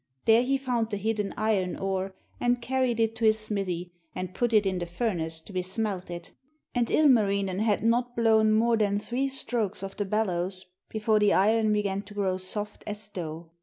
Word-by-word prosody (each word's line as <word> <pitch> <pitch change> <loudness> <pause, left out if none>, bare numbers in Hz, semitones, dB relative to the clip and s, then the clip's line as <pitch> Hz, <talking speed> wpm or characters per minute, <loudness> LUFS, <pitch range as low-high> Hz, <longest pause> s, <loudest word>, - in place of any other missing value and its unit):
There 225 +1 +6
he 270 +2 +1
found 245 -4 -1
the 205 - -2
hidden 210 0 -1
iron 205 -4 +1
ore, 190 0 -2 0.2
and 245 0 +2
carried 250 -1 0
it 225 0 +1
to 225 - 0
his 215 0 +5
smithy 190 -5 -3 0.2
and 185 0 -4
put 240 -1 0
it 215 -2 +4
in 190 -2 0
the 175 - -4
furnace 170 -4 -2
to 195 - -13
be 185 - 0
smelted. 185 -3 -4 0.4
And 240 -2 +1
Ilmarinen 200 -9 +3
had 215 -1 +1
not 240 +2 +1
blown 220 -2 +4
more 230 +2 +3
than 205 -2 +2
three 245 +6 -1
strokes 225 -7 -2
of 195 0 -6
the 205 - -1
bellows 185 -3 -1 0.2
before 215 0 +1
the 210 -1 +4
iron 215 +2 +3
began 200 -2 0
to 205 0 -13
grow 190 -2 0
soft 205 +3 -4
as 210 0 -3
dough. 165 -3 -6
210 Hz, 190 wpm, -27 LUFS, 190-225 Hz, 0.4 s, There